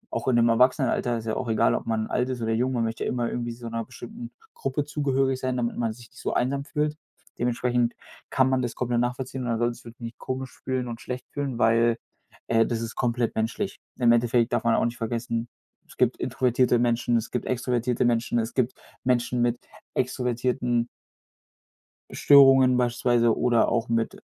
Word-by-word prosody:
auch - - -3
in 125 - +3
dem 120 0 +4
Erwachsenenalter 125 0 +2
ist 115 - -7
ja 110 - -1
auch 125 -3 -3
egal, 85 - +3
ob - - -3
man 110 -1 0
alt 125 +3 -1
ist 125 -2 -3
oder 115 0 -1
jung, 125 +3 +1
man 120 -2 0
möchte 115 0 -3
ja - - -1
immer 120 -2 -1
irgendwie 120 -1 -3
so 115 0 -8
'ner 115 0 -3
bestimmten 225 - -9 0.2
Gruppe 150 - -2
zugehörig 135 -3 0
sein, 130 -1 -2
damit 120 -1 -1
man 115 -2 -1
sich 115 +1 -12
nicht - - -16
so - - -2
einsam 140 +3 0
fühlt. 150 -1 -1 0.4
Dementsprechend 120 0 0 0.3
kann 130 -1 +3
man 130 -1 +1
das 120 -2 -3
komplett 120 -1 0
nachvollziehen 125 +2 -2
und 120 - -3
da 115 - 0
solltest 120 0 -2
du - - -8
dich 120 - -17
nicht 115 0 -8
komisch 130 -1 -5
fühlen 130 -1 -2
und 115 -1 -6
schlecht 125 0 -6
fühlen, 140 -4 -3
weil 115 0 +3 0.5
äh, 115 0 +4
das 115 -1 -2
ist 115 0 -5
komplett 120 -1 0
menschlich. 115 - -2 0.2
Im 120 -2 +4
Endeffekt 120 0 +2
darf - - +1
man 115 -1 +3
auch - - +2
nicht 120 0 -3
vergessen, 115 0 -2 0.4
es - - -17
gibt - - +2
introvertierte 125 -1 +2
Menschen, 120 0 +2
es 115 - -4
gibt 125 - -2
extrovertierte 125 -1 0
Menschen, 120 0 +1
es 115 0 -3
gibt 130 -1 0 0.3
Menschen 125 -1 +1
mit 120 0 +1 0.4
extrovertierten 125 -1 0 1.2
Störungen 135 -2 +6
beispielsweise 120 -1 +2
oder 120 -2 +3
auch 115 0 0
mit 115 -1 -1
120 Hz, 195 wpm, -26 LUFS, 115-130 Hz, 1.2 s, Störungen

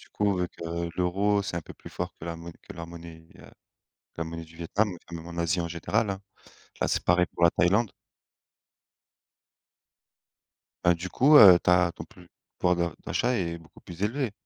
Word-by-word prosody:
Du - - -18
coup, 105 -1 +1
avec, 90 -1 -2
heu, 85 +1 -3
l'euro, 100 +3 +1
c'est 95 - -4
un - - -1
peu - - -12
plus - - -13
fort - - -5
que - - -9
la 85 -1 -4
monn 85 +1 -9
que - - -11
la 85 - -8
monnaie, 85 -1 -11
heu, - - -14 0.7
la 85 - -1
monnaie 80 0 -7
du 80 +1 -18
Vietnam, 100 +5 0 0.2
même 85 0 -7
en 85 0 -8
Asie, 85 +1 0
en 85 - -3
général, 100 +6 -1
hein. 95 0 -4 0.6
Là, - - +1
c'est - - -1
pareil 90 0 +3
pour 85 - +2
la 85 - +7
Thaïlande. 100 +7 +2 2.9
Bah, 85 0 +5
du 90 +2 -6
coup, 145 +4 +5
heu, 95 -9 +10
tu - - -2
as, 90 -1 +4
ton - - -9
puv 90 - -18 0.3
pouvoir 90 0 +3
de 85 -2 -2
d'achat 125 - 0
est 85 -2 -3
beaucoup 80 0 -18
plus 85 +1 -10
élevé 120 +2 -1
85 Hz, 200 wpm, -27 LUFS, 85-100 Hz, 2.9 s, heu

